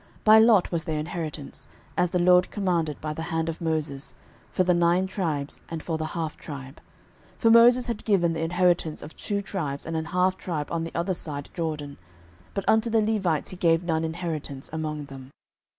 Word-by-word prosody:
06:014:002 - - -33
By 215 0 +8
lot 220 -4 +5
was 170 -2 -1
their 155 -1 -2
inheritance, 155 -2 -5 0.3
as 180 - +2
the 180 - 0
LORD 180 +1 +5
commanded 170 -7 -1
by 155 0 -3
the 160 - -6
hand 165 0 -1
of 165 - -5
Moses, 155 -4 -2 0.3
for 185 - +1
the 180 0 +3
nine 175 +2 +3
tribes, 160 -7 -2
and 165 -1 -5
for 160 -2 -2
the 155 - -2
half 160 -2 -2
tribe. 135 -1 -9 0.6
06:014:003 - - -28
For 225 - +5
Moses 240 +2 +7
had 235 -3 -4
given 175 -6 +2
the 160 - -3
inheritance 175 -1 +1
of 150 - -10
two 200 -1 -3
tribes 150 -9 -4
and 165 - -4
an 160 0 -1
half 180 +2 +1
tribe 155 -5 -4
on 165 -1 -1
the 165 - -8
other 175 +3 0
side 145 -4 -6
Jordan: 155 -4 -4 0.6
but 195 -1 -2
unto 220 +1 +3
the 225 0 +3
Levites 195 -8 0
he - - -7
gave 165 -1 +2
none 160 -2 0
inheritance 160 -5 -4
among 155 -2 -3
them. 135 -2 -11
165 Hz, 200 wpm, -26 LUFS, 155-185 Hz, 0.6 s, By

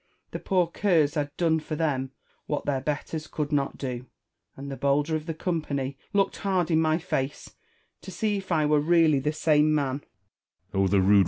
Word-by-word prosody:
The - - -4
poor 185 -2 +2
curs 165 -4 +2
had 145 -2 -1
done 165 -2 +2
for 155 0 -5
them 140 -4 -1 0.4
what 150 - -2
their 135 -2 0
betters 150 +2 -3
could 150 -1 -3
not 140 -2 0
do 125 -3 -3
j 125 - -15 0.5
and 140 +1 -7
the - - -4
bolder 145 +3 +1
of 155 +1 -4
the 165 - -2
company 145 -6 -2 0.2
looked 200 -2 +1
hard 185 -4 0
in 160 0 +4
my 155 0 +2
face, 145 -5 -3 0.5
to - - -10
see 215 -2 -1
if 190 -1 -7
I 155 -3 +3
were 150 0 +3
really 160 -2 +4
the 150 +3 0
same 155 0 +3
man. 140 -1 -1
155 Hz, 180 wpm, -26 LUFS, 140-165 Hz, 0.5 s, in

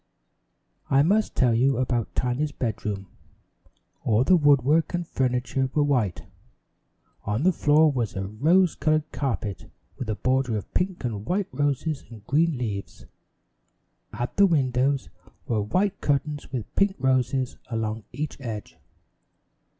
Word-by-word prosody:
I 135 +1 +5
must 210 +7 +2
tell 125 -2 +3
you 130 +3 +3
about 120 -3 -1
Tiny's 130 +4 0
bedroom. 105 -6 -3 1.0
All 110 +2 +3
the 185 - +5
woodwork 145 +1 +3
and 175 -1 -3
furniture 130 0 0
were 150 - +4
white. 125 -11 0 1.0
On 105 +7 -1
the 185 - +5
floor 155 -1 +4
was 120 -7 -2
a 95 0 -2
rose 160 - +3
colored 155 0 0
carpet, 115 -8 -3 0.3
with 120 - -4
a 110 - 0
border 130 +1 0
of 100 - -8
pink 180 -2 -1
and 110 -5 -3
white 195 +2 0
roses 145 +1 -1
and 110 -4 -12
green 155 +3 +2
leaves. 105 -5 -5 1.1
At 120 - -5
the 200 0 +7
windows 135 -3 +1 0.4
were 110 -3 0
white 190 - 0
curtains 145 +1 -1
with 125 -6 -5
pink 200 -1 +2
roses 130 -1 0
along 110 -1 -2
each 145 +4 -4
edge. 110 -5 -6
130 Hz, 135 wpm, -25 LUFS, 115-155 Hz, 1.1 s, the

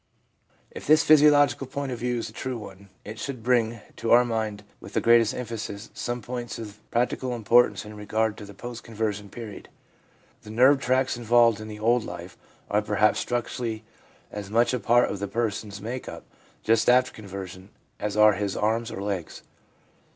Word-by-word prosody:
If - - -9
this 155 +2 +6
physiological 145 -3 +5
point 140 0 -4
of 120 - -4
view 125 0 -1
is 115 - -3
a - - -11
true 130 -1 -4
one, 100 -2 -11 0.2
it 110 +1 -8
should 130 -5 -5
bring 115 -2 +1 0.2
to 115 - -3
our 120 +1 +7
mind 110 -3 -3 0.2
with - - -12
the - - +2
greatest 115 -1 +4
emphasis 115 -3 -6
some 120 -1 -4
points 120 0 -5
of 105 -2 -9
practical 125 +1 -1
importance 120 +1 +3
in 105 0 -10
regard 110 +1 -1
to 105 - -9
the 100 -1 -12
post 120 +2 -8
conversion 105 -3 -3
period. 110 -1 -9 0.7
The - - -13
nerve 130 +5 +5
tracts 130 0 +1
involved 120 -2 +4
in 110 - -7
the 105 -1 -8
old 115 +2 +2
life 90 0 -8 0.3
are 105 +1 +1
perhaps 105 0 +2
structurally 120 -2 -3 0.5
as 105 -1 -6
much 115 +4 +2
a 125 - 0
part 120 +3 +4
of 100 - -5
the 100 - -3
person's 105 -2 -3
make 120 +4 -5
up - - -9 0.4
just 115 +1 +3
after 125 +1 +4
conversion 95 -2 -9 0.3
as 105 0 -3
are 105 0 +7
his 100 -1 -2
arms 110 +2 0
or 100 - -6
legs. 100 -5 -4
115 Hz, 180 wpm, -26 LUFS, 105-120 Hz, 0.7 s, our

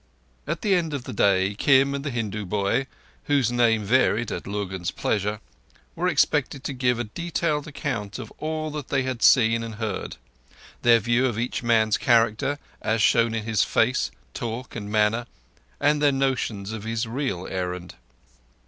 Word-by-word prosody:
At - - -3
the 205 - +3
end 165 -5 +1
of 135 - -5
the - - -7
day, 95 -1 +3
Kim 135 +5 +4
and 140 0 -3
the 145 - -2
Hindu 110 -4 -3
boy—whose 120 +5 -1
name 115 -3 +3
varied 115 0 +2
at - - -5
Lurgan's 95 -3 -3
pleasure—were 105 - -4
expected 135 - +1
to 140 - -3
give 125 -2 +1
a 120 - -1
detailed 155 +4 -2
account 125 -9 -4
of - - -8
all 155 0 -3
that 145 -3 -6
they 135 -2 0
had 130 -3 -4
seen 115 -2 +5
and 115 -1 -6
heard—their 95 - -2
view 120 +4 +2
of 120 -4 -3
each 120 +2 -2
man's 110 -3 +2
character, 120 +4 +2 0.2
as 110 -1 +1
shown 115 -1 +3
in 110 - -2
his 110 -1 +1
face, 125 +3 +1 0.2
talk, 120 +2 -5
and 105 -2 -5
manner, 110 +3 +2 0.5
and 145 +1 +2
their 145 -1 +5
notions 125 -7 -1
of 110 -2 -6
his 115 +1 -2
real 115 -7 -3
errand. 90 -1 -4
115 Hz, 160 wpm, -24 LUFS, 105-135 Hz, 0.5 s, seen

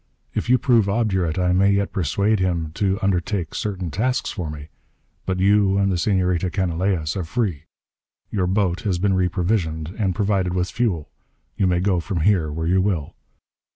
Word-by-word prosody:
If - - -3
you 125 - +6
prove 115 -6 +3
obdurate, 95 -7 0
I 90 -1 +2
may 100 +2 +4
yet 100 0 0
persuade 100 +5 +1
him 85 -4 -1
to 95 +1 0
undertake 90 -2 -1
certain 95 -5 -3
tasks 125 - -1
for 90 -6 -4
me. 75 0 -8 0.6
But 95 -1 -1
you 100 0 +3
and 100 -1 +2
the 90 - 0
Senorita 90 -2 +1
Canalejas 90 -3 -1
are 95 - -2
free. 85 - -2 0.7
Your 95 -4 0
boat 95 -2 +1
has 95 -4 0
been 95 +2 +1
reprovisioned 90 -3 0
and 95 -4 0
provided 100 -4 0
with 90 0 -1
fuel. 100 -11 -1 0.4
You 95 - +1
may 90 -1 +1
go 95 -2 +2
from 85 -1 -3
here 85 -4 +2
where 80 +2 -3
you 95 +3 +3
will." 90 -7 -1
95 Hz, 175 wpm, -22 LUFS, 85-100 Hz, 0.7 s, you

